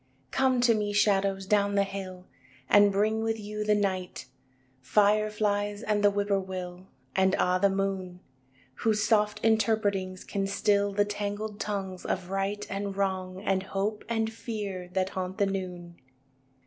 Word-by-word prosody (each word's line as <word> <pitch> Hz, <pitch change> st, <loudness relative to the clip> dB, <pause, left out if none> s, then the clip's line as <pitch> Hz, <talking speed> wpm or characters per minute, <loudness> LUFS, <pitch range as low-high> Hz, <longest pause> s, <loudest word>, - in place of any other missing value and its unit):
II 130 Hz, +1 st, -38 dB
Come 260 Hz, -2 st, +2 dB
to 240 Hz, -1 st, +5 dB
me, 210 Hz, -1 st, -1 dB
shadows, 195 Hz, -2 st, +2 dB
down 200 Hz, 0 st, +2 dB
the 200 Hz, -, +4 dB
hill 190 Hz, -2 st, -7 dB, 0.4 s
And 205 Hz, 0 st, +6 dB
bring 215 Hz, +3 st, +1 dB
with 225 Hz, 0 st, -1 dB
you 210 Hz, 0 st, -4 dB
the 210 Hz, 0 st, +3 dB
night, 190 Hz, -6 st, -2 dB, 0.5 s
Fire 210 Hz, +9 st, +3 dB
flies 205 Hz, 0 st, -1 dB
and 210 Hz, -1 st, 0 dB
the 205 Hz, -, +7 dB
whippoorwill 190 Hz, -3 st, -2 dB, 0.3 s
And 190 Hz, 0 st, +3 dB
ah, 180 Hz, 0 st, +2 dB
the 200 Hz, +1 st, +4 dB
moon 190 Hz, -2 st, -2 dB, 0.6 s
Whose 215 Hz, -2 st, +1 dB
soft 210 Hz, -1 st, +2 dB
interpretings 205 Hz, -4 st, +1 dB
can 195 Hz, -1 st, -2 dB
still 200 Hz, 0 st, +2 dB
The 205 Hz, +1 st, +2 dB
tangled 205 Hz, +1 st, -4 dB
tongues 190 Hz, -3 st, -4 dB
of 185 Hz, 0 st, -3 dB
right 195 Hz, +1 st, -1 dB
And 200 Hz, 0 st, -4 dB
wrong, 190 Hz, -1 st, -2 dB
and 195 Hz, -2 st, +1 dB
hope 195 Hz, +2 st, -3 dB
and 225 Hz, -1 st, 0 dB
fear, 200 Hz, -6 st, -5 dB
that 190 Hz, 0 st, +1 dB
haunt 185 Hz, -1 st, -4 dB
the 200 Hz, -, +3 dB
noon. 180 Hz, -3 st, -5 dB
200 Hz, 155 wpm, -28 LUFS, 190-210 Hz, 0.6 s, the